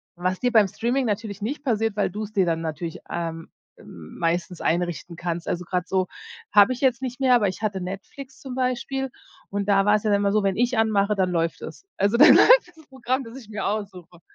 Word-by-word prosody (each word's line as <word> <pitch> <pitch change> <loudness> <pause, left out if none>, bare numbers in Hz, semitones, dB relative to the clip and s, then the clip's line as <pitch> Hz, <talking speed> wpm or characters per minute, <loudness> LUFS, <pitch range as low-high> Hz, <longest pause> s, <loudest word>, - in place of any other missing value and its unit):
was 180 +1 -2
dir 245 - 0
beim 220 -4 +5
Streaming 245 +7 -1
natürlich 210 -2 -3
nicht 275 +8 -4
passiert, 225 -5 0
weil 205 - 0
du's 210 +2 -6
dir 195 -3 +2
dann 165 -1 -1
natürlich, 165 +1 -5
ähm, 165 -1 -5 0.3
m 80 -2 -13
meistens 170 +1 -1
einrichten 175 0 -2
kannst. 170 -1 -4
Also 175 0 -3
grad 180 0 -2
so 185 -1 +1 0.5
habe 205 +4 +6
ich 250 - -8
jetzt 260 -2 +2
nicht 255 -1 -5
mehr, 260 -2 +4
aber 210 -5 +2
ich 185 - -8
hatte 205 -3 -2
Netflix 195 +9 -8
zum 260 -2 -8
Beispiel 260 +1 -2 0.4
und 200 0 -3
da 195 -1 +4
war 210 0 +5
es 210 - -1
ja 215 - +1
dann 200 0 +2
immer 200 -1 +1
so, 210 0 +1
wenn 195 -1 +1
ich 245 +1 +1
anmache, 210 -2 +2
dann 185 -2 0
läuft 165 -1 -1
es. - - -9
Also 200 +3 +2
dann 285 - +9
läuft - - +6
das 315 - -18
Programm, 260 0 -2
das 230 +3 -10
ich 235 -6 -13
mir 210 -2 -4
aussuche. 195 -4 -5
205 Hz, 225 wpm, -24 LUFS, 180-240 Hz, 0.5 s, dann